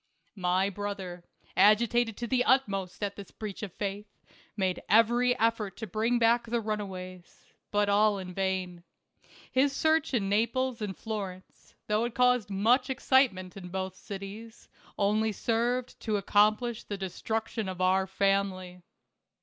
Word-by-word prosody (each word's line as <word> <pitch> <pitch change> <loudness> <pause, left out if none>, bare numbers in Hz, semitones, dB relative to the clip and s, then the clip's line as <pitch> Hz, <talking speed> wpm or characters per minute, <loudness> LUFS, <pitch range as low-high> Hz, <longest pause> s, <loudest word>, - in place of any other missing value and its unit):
My 180 +2 +2
brother, 190 -3 -5 0.3
agitated 225 +3 +4
to 240 - -3
the 250 +1 +1
utmost 200 -8 +1
at 200 -1 -2
this 200 -2 -10
breach 210 -3 -7
of 210 -4 -5
faith, 205 +3 -4 0.5
made 190 -2 0
every 240 +3 +4
effort 220 -4 0
to 225 - -5
bring 220 +5 0
back 235 0 +3
the 235 +1 0
runaways; 190 -5 -6 0.2
but 205 0 +1
all 205 0 +3
in 185 -1 -7
vain. 185 -2 -2 0.7
His 270 +2 +3
search 315 -3 +2
in 200 -5 0
Naples 230 +4 0
and 200 -3 -4
Florence, 195 -4 -7
though 215 +2 +1
it 240 - -5
caused 250 -4 +3
much 235 +7 +2
excitement 250 -9 +2
in 190 -2 -8
both 190 0 -3
cities, 200 +3 -9 0.3
only 215 +2 +2
served 240 +4 -1
to 215 -3 -1
accom 210 +2 +4
plish 240 -2 -5
the 205 - -5
destruction 215 +2 -3
of 185 -1 -6
our 190 +1 +2
family. 190 -2 0
210 Hz, 145 wpm, -29 LUFS, 190-230 Hz, 0.7 s, agitated